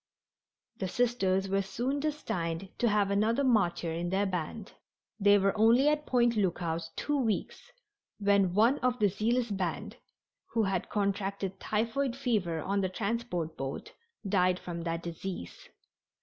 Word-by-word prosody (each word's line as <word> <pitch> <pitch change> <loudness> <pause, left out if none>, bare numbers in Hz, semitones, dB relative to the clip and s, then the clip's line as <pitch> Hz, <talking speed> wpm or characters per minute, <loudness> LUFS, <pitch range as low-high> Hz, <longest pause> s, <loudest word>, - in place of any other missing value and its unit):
The 190 - -2
Sisters 195 -4 +1
were 195 +1 +1
soon 250 +8 -2
destined 190 - -3
to 240 - +3
have 205 -1 +2
another 220 +6 +2
martyr 175 -9 +2
in 170 +1 -2
their 195 +2 +1
band. 190 +3 -4 0.5
They 205 0 +6
were 195 +1 +2
only 230 +6 +5
at 300 0 -1
Point 240 -2 +3
Lookout 170 -4 -1
two 295 - -1
weeks 225 -5 -2 0.5
when 200 -3 +2
one 230 +7 +4
of 250 -1 +1
the 210 -3 +3
zealous 230 +4 0
band, 185 -4 -3 0.6
who 225 - +2
had 190 -3 -1
contracted 195 -1 -2
typhoid 235 +4 -1
fever 205 - -1
on 200 +1 0
the 190 - 0
transport 200 -5 -2
boat, 135 0 -5 0.4
died 185 -2 +3
from 170 -2 -6
that 165 0 -2
disease. 170 - -7
200 Hz, 145 wpm, -30 LUFS, 180-235 Hz, 0.6 s, They